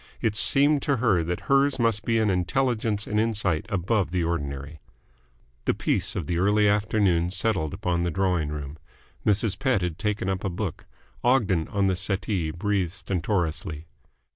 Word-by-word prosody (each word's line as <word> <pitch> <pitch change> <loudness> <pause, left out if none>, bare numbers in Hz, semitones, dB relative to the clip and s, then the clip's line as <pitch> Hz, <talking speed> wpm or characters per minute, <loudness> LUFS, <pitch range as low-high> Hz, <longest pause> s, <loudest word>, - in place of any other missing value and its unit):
It 110 -2 0
seemed 140 +6 +5
to 140 -2 +1
her 110 -8 +2
that 85 +2 -3
hers 140 0 +2
must 115 -3 +1
be 115 -1 +2
an 110 -2 +2
intelligence 105 +3 0
and 105 - -1
insight 105 -4 0
above 95 -1 0
the 90 0 -1
ordinary. 75 -2 -4 0.9
The - - +1
peace - - -1
of 90 - -3
the 85 +3 -1
early 105 +2 +3
afternoon 100 -4 +2
settled 90 -4 0
upon 90 -3 -1
the 85 - 0
drawing 90 -3 0
room. 75 0 -6 0.5
Mrs. 105 -1 +1
Pett 130 -9 +1
had 85 -3 -3
taken 105 -2 -2
up 95 0 -2
a 100 - -1
book; 90 -1 -5 0.4
Ogden, 105 -10 +2
on 100 -1 0
the 95 -1 +2
settee, 95 -2 -1
breathed 95 +1 -1
stentorously. 85 -4 -2
95 Hz, 165 wpm, -25 LUFS, 85-110 Hz, 0.9 s, seemed